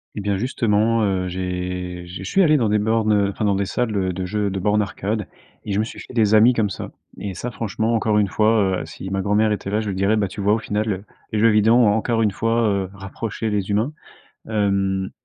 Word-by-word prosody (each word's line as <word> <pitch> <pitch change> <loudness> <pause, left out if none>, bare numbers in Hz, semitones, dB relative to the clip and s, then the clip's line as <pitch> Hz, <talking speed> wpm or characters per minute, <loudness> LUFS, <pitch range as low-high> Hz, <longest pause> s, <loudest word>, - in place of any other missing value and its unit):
Et 105 - -4
bien 100 -1 0
justement, 115 -1 +1
heu, 95 -2 0
j'ai 90 -1 -4
j'ai 90 +2 -8
je 95 - -5
suis 195 - +4
allé 155 -3 +5
dans 115 -6 +1
des 105 - +3
bornes, 110 +1 +1
heu, 100 -1 +2
enfin 105 - -3
dans 100 -1 +2
des 100 +1 0
salles, 110 +2 -2
heu, 95 -1 0
de 95 +1 -4
jeux, 100 +1 -1
de 95 - -3
bornes 105 +2 +2
arcade 105 +1 -3 0.4
et 105 - -2
je 100 - +1
me - - +2
suis 110 - -8
fait - - -11
des 110 -3 +3
amis 115 +4 +6
comme 110 -4 +1
ça. - - -6 0.3
Et 100 -2 -5
ça, 125 +7 -5
franchement, 110 0 -1
encore 110 -1 +2
une 105 - +2
fois, 105 -2 +2
heu, - - -6
si 95 - -8
ma 95 0 -1
grand-mère 105 +2 +2
était 100 -1 -3
là, 105 +1 +1
je 110 - -5
lui 95 - -3
dirais: 100 +3 +2
«Bah 105 -2 +1
tu 95 - -9
vois 100 +1 +3
au 110 - +1
final, 105 -2 -2 0.3
les 110 - 0
jeux 115 +2 +5
vidéo 105 +1 +4
ont 120 -2 +5
encore 115 +1 0
une 110 - +3
fois, 115 +3 0
heu, 100 -2 -1
rapproché 100 +3 -5
les 100 -1 -1
humains». 110 +7 +1 0.6
Hem, 100 -2 0
105 Hz, 250 wpm, -21 LUFS, 95-110 Hz, 0.6 s, amis